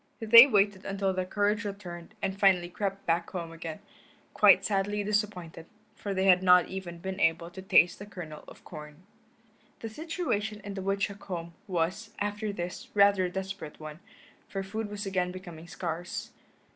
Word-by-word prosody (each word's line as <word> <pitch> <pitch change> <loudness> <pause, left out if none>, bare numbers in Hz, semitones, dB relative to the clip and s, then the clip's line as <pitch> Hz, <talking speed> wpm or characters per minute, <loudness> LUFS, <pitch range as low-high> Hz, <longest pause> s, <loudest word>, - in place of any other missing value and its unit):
They 230 +3 +10
waited 205 -5 +2
until 195 -1 -1
their 185 0 -2
courage 205 +3 +1
returned 195 -2 -7
and 195 0 -2
finally 185 -3 +4
crept 195 +1 -4
back 170 0 0
home 170 -3 -5
again, 165 +2 -7 0.5
quite - - +6
sadly 205 0 0
disappointed, 200 -6 -2 0.3
for 205 - -5
they 190 0 0
had 185 -1 +6
not 180 -2 +6
even 185 -3 -6
been 190 +3 -5
able 170 -1 +1
to 190 - -9
taste 185 -1 +4
a 205 - -8
kernel 170 -6 -9
of - - -14
corn. 150 0 -11 0.8
The 225 - -5
situation 220 - -3
in 200 - -6
the 195 - -5
woodchuck 195 +1 -2
home 170 -2 -5
was, 185 +5 -2
after 205 +1 -2
this, 175 -2 -6
rather 200 -2 +5
a - - -2
desperate 190 -4 -6
one, 155 0 -8 0.5
for 195 -1 -3
food 210 +2 -4
was 205 0 -5
again 185 -2 -1
becoming 175 -3 -10
scarce. 175 -1 -5
190 Hz, 170 wpm, -29 LUFS, 175-205 Hz, 0.8 s, They